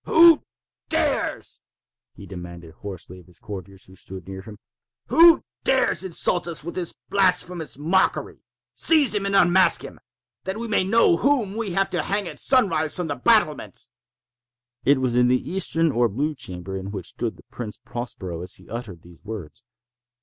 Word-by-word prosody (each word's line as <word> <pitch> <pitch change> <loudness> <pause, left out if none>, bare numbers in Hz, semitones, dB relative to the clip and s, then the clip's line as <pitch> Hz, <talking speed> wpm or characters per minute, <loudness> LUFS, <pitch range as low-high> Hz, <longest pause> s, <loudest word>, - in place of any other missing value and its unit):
"Who 330 -1 +7 0.5
dares?" - - -1 0.5
he 100 - -11
demanded 85 -3 -10
hoarsely 95 -2 -8
of 90 - -19
the 90 - -13
courtiers 95 -2 -9
who 95 - -16
stood 95 0 -10
near 95 0 -7
him—"who 120 - +2 0.2
dares 265 -6 +2
insult 175 -1 +1
us 160 -5 -4
with 170 - -6
this 175 -2 -4
blasphemous 180 -5 0
mockery? 170 +6 0 0.3
Seize 305 -8 +4
him 200 -1 -1
and 200 - 0
unmask 185 0 +5
him—that 190 +2 -10
we 235 +1 -4
may 210 -3 +2
know 195 -3 +4
whom 240 -5 +1
we 220 -5 -3
have 195 +1 +1
to 175 -3 0
hang 200 +4 -1
at - - -5
sunrise, 195 - +2
from 175 -3 -3
the 145 - -1
battlements!" 210 - +1 1.0
It 140 0 +4
was 130 -2 0
in 125 0 +4
the 125 +1 +4
eastern 165 -1 0
or 120 -2 +2
blue 145 +9 -2
chamber 90 -7 -6
in 95 0 -5
which 100 - -6
stood 115 -1 -4
the - - -17
Prince 110 -4 -7
Prospero 105 -8 -6
as 90 0 -3
he 90 - -11
uttered 105 -7 -7
these 85 -1 -17
words. 105 -1 -8
145 Hz, 165 wpm, -23 LUFS, -, 1.0 s, Who